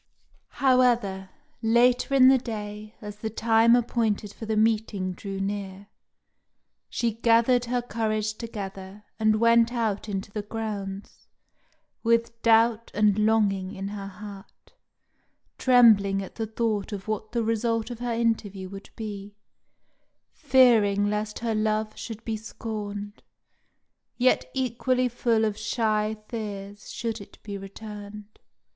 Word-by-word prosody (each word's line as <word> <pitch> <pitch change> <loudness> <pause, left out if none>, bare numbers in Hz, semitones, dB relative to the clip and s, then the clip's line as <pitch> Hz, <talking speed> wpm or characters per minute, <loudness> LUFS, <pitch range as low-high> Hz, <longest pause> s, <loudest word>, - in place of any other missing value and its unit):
However, 240 -7 +3 0.3
later 245 +4 +3
in 260 -1 +7
the 265 0 +6
day, 215 -2 -7
as 210 0 -7
the 220 +1 -4
time 225 +1 +4
appointed 225 -4 0
for 220 - -8
the 220 -1 0
meeting 215 -3 +1
drew 195 +1 -6
near, 195 0 -4 1.0
she 235 -2 -1
gathered 235 +2 +3
her 245 0 -1
courage 215 -2 -1
together, 200 -3 -7 0.2
and 215 -1 +3
went 230 0 +4
out 220 -3 -2
into 195 0 -4
the 210 - -3
grounds, 205 -2 -6 0.7
with 230 0 +1
doubt 230 0 +3
and 210 -1 +3
longing 210 -3 +1
in 195 +1 -4
her 200 -1 -6
heart, 200 - -12 0.9
trembling 210 -6 +5
at 190 - -10
the 225 -1 -4
thought 220 -2 -1
of 200 -1 -6
what 215 0 -3
the 235 -1 0
result 230 +1 0
of 240 - -7
her 240 -1 -2
interview 215 -5 -1
would 195 0 -10
be, 205 -2 -7 1.0
fearing 225 -8 +4
lest 210 0 -2
her 230 -1 -2
love 215 0 0
should 225 -1 -8
be 225 - -2
scorned, 210 -1 -6 1.0
yet 255 +1 +2
equally 255 0 +1
full 235 -2 +1
of 215 -2 -1
shy 215 -1 0
fears 205 -3 -6
should 230 -2 -4
it 200 - -13
be 205 -1 -6
returned. 205 +1 -9
215 Hz, 130 wpm, -26 LUFS, 205-230 Hz, 1.0 s, in